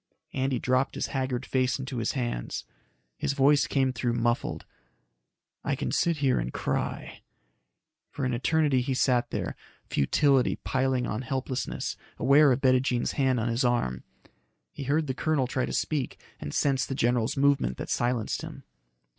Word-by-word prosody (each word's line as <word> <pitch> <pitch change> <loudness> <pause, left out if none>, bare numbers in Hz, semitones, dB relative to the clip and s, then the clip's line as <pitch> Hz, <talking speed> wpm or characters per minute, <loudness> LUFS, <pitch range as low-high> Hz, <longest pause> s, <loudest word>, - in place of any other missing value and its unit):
Andy 130 -1 0
dropped 130 +1 +1
his - - -2
haggard 130 -2 -1
face 130 0 +1
into 130 -1 -5
his 115 -1 -1
hands. 120 - -3 0.5
His - - 0
voice 140 +1 +4
came 130 -2 +1
through 120 -2 -1
muffled. 120 0 -1 1.0
"I - - 0
can 65 - -3
sit 170 -2 +1
here 135 -3 +2
and - - -3
cry." - - -3 0.9
For 140 - -4
an 130 - 0
eternity 145 +1 +2
he 130 +1 -1
sat 125 -2 +2
there, - - -3 0.3
futility 135 - +2
piling 130 -1 +1
on 110 +1 -3
helplessness, 130 +1 -3 0.2
aware 145 +1 +5
of 130 +2 +1
Bettijean's 130 -2 +2
hand 130 -3 +1
on 115 - -1
his 115 +3 0
arm. 120 - 0 0.7
He 140 - -7
heard 150 +4 +1
the 130 - -2
colonel 150 -1 +1
try 130 +1 -1
to - - -4
speak 145 -5 -2 0.2
and 70 - -5
sensed 135 - +1
the 135 - -2
general's 120 0 +1
movement 135 - +2
that - - -5
silenced 120 -2 0
him. - - -9
130 Hz, 160 wpm, -28 LUFS, 120-135 Hz, 1.0 s, aware